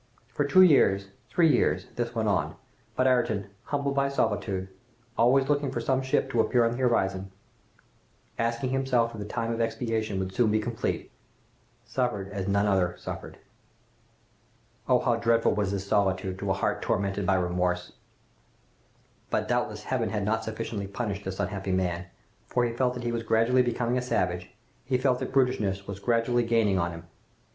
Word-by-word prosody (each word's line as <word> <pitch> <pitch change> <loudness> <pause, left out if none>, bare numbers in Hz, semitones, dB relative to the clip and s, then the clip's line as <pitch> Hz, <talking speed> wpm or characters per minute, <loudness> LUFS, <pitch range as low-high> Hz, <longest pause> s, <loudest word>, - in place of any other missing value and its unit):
For 140 +4 -1
two 185 +6 +7
years, 100 - +4 0.2
three 175 -2 +4
years, 120 - +1
this 120 0 -3
went 110 -1 0
on, 100 -3 0 0.4
but 130 - +2
Ayrton, 110 -6 +1
humbled 140 -1 -1
by 140 0 +1
solitude, 100 -7 -1 0.5
always 130 +3 +4
looking 145 -1 +1
for - - -3
some 130 +3 +1
ship 130 0 +1
to 120 - 0
appear 120 0 +3
on 115 - +1
the 120 - -4
horizon, 95 -6 +1 1.1
asking 115 +3 -1
himself 125 -3 +1
if 110 - -8
the 105 - -4
time 115 +1 -2
of 115 - -2
expiation 115 -2 -1
would 95 0 -3
soon 115 +2 +3
be 110 +1 +2
complete, 115 +1 -3 0.7
suffered 105 -7 -2
as 100 -1 -4
none 100 +1 +2
other 95 -3 +2
suffered! - - -7 1.5
Oh! 125 - +6
how 120 -2 +2
dreadful 115 0 +2
was 105 -2 0
this 100 -1 -3
solitude, 95 -2 0
to 100 - -3
a - - +3
heart 95 - -1
tormented 100 -1 -1
by 95 - +4
remorse! 90 0 0 1.4
"But - - 0
doubtless - - -1
Heaven - - -1
had 105 -2 -2
not 110 +2 0
sufficiently 110 -2 -4
punished 100 -1 -4
this 95 0 -5
unhappy 95 -1 -2
man, 90 -1 -1 0.4
for 125 -1 +1
he 115 - -2
felt 125 +1 0
that 125 - -6
he 120 - -1
was 115 0 -2
gradually 115 +3 +3
becoming 120 0 0
a - - -3
savage! 90 -7 -1 0.3
He 130 - 0
felt 125 -1 +1
that - - -4
brutishness 110 -8 +1
was 100 -1 -6
gradually 120 +2 +2
gaining 115 -5 +2
on 85 0 0
him! 85 -1 -8
115 Hz, 175 wpm, -27 LUFS, 95-125 Hz, 1.5 s, two